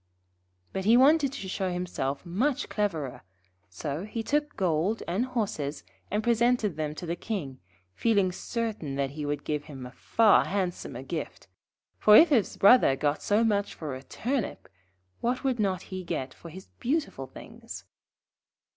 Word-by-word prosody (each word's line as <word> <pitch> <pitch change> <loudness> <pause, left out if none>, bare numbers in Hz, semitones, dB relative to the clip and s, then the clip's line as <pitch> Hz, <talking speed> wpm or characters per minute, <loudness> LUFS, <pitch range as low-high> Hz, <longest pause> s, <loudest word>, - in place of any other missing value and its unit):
] 90 0 -43
But 190 0 -3
he 230 +3 +6
wanted 280 +1 +5
to 195 - -6
show 190 0 -2
himself 175 -5 -3
much 250 +11 0
cleverer, 165 - -2 0.5
so 140 - -4
he 225 +2 -4
took 295 +3 0
gold 185 +3 +1
and 200 +9 0
horses 195 - -3 0.3
and 210 +2 -1
presented 235 -4 +2
them 155 -1 -3
to 175 - -6
the 170 +1 -2
King, 170 - -5 0.3
feeling 200 - +2
certain 210 - -3
that 135 -1 -1
he 145 0 -5
would 145 0 -2
give 150 -1 -2
him 135 -4 -8
a 125 - -9
far 215 - +4
handsomer 180 -9 -3
gift; 155 +1 -5 0.5
for 210 - +7
if 335 - +8
his 245 -9 +2
Brother 200 - +6
got 145 +2 0
so 210 +2 +2
much 205 -3 0
for 150 -4 -5
a 130 - -6
Turnip, 245 - -3 0.5
what 245 +2 -1
would 260 -3 0
not 190 -3 0
he 185 0 -4
get 145 -7 -4
for 170 - -12
his 185 +4 -10
beautiful 255 - -1
things. - - -10
185 Hz, 165 wpm, -28 LUFS, 145-230 Hz, 0.5 s, if